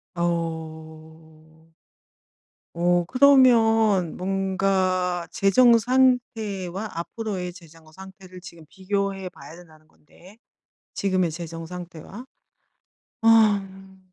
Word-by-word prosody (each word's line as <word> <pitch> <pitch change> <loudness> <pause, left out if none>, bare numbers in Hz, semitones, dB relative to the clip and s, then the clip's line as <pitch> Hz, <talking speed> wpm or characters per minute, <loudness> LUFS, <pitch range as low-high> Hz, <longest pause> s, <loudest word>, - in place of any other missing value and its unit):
어. 160 -1 -6 1.1
어 175 0 +1
그러면 225 - +4
뭔가 185 -2 -1
재정 230 +4 +4
상태와 220 -6 -1
앞으로의 180 0 -5
재정 165 -3 -17
상태를 190 0 -13
지금 170 -3 -13
비교해 195 -1 -3
봐야 165 - -14
된다는 155 -3 -18
건데, 185 +8 -20 0.6
지금의 185 -4 0
재정 165 0 -8
상태와. 180 +5 -10 1.0
아. 195 -4 +2
185 Hz, 180 characters per minute, -23 LUFS, 165-200 Hz, 1.1 s, 그러면